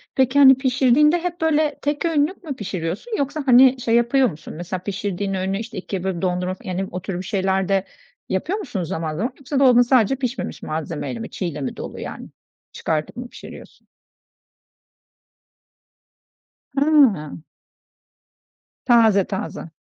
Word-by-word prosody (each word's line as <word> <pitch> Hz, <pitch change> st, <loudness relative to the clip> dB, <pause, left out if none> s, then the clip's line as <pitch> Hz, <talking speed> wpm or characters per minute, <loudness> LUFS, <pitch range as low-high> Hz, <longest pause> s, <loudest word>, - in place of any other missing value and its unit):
Peki, 265 Hz, +1 st, +3 dB
hani, 265 Hz, -1 st, +9 dB
pişirdiğinde 270 Hz, +5 st, +3 dB
hep 350 Hz, -1 st, -4 dB
böyle 310 Hz, -2 st, +1 dB
tek 290 Hz, +3 st, -1 dB
öğünlük 325 Hz, +3 st, 0 dB
mü 285 Hz, -5 st, -5 dB
pişiriyorsun 190 Hz, -, -4 dB
yoksa, 285 Hz, +1 st, -2 dB
hani, 255 Hz, 0 st, +6 dB
şey 230 Hz, -1 st, +1 dB
yapıyor 240 Hz, +2 st, +3 dB
musun, 155 Hz, -3 st, -10 dB
mesela 175 Hz, +3 st, -5 dB
pişirdiğin 200 Hz, -1 st, -3 dB
öğünü, 190 Hz, +1 st, -1 dB
işte, 225 Hz, -2 st, -7 dB
2'ye 190 Hz, 0 st, -4 dB
bölüp 190 Hz, -3 st, -2 dB
dondurup 180 Hz, 0 st, -2 dB
yani 190 Hz, +1 st, -3 dB
o 180 Hz, 0 st, -5 dB
tür 190 Hz, -2 st, -4 dB
bir 185 Hz, -, -6 dB
şeyler 190 Hz, -2 st, 0 dB
de 195 Hz, -1 st, +1 dB, 0.4 s
yapıyor 335 Hz, -, -1 dB
musun 200 Hz, -, -4 dB
zaman 160 Hz, -1 st, -3 dB
zaman? 245 Hz, +6 st, -2 dB
Yoksa 280 Hz, 0 st, -2 dB
dolabın 250 Hz, -3 st, +6 dB
sadece 245 Hz, 0 st, +3 dB
pişmemiş 250 Hz, -2 st, -4 dB
malzemeyle 160 Hz, +8 st, -4 dB
mi, 225 Hz, -, -6 dB
çiğ 185 Hz, -, -5 dB
ile 150 Hz, -4 st, -4 dB
mi 130 Hz, -, -4 dB
dolu, -, -, -7 dB
yani? -, -, -7 dB, 0.4 s
Çıkartıp 155 Hz, +6 st, -3 dB
mı 245 Hz, 0 st, -6 dB
pişiriyorsun? -, -, -13 dB, 2.9 s
Hıı. 260 Hz, -, +3 dB, 1.4 s
Taze 225 Hz, -5 st, +5 dB
taze. 190 Hz, -4 st, -5 dB
225 Hz, 145 wpm, -21 LUFS, 185-270 Hz, 2.9 s, hani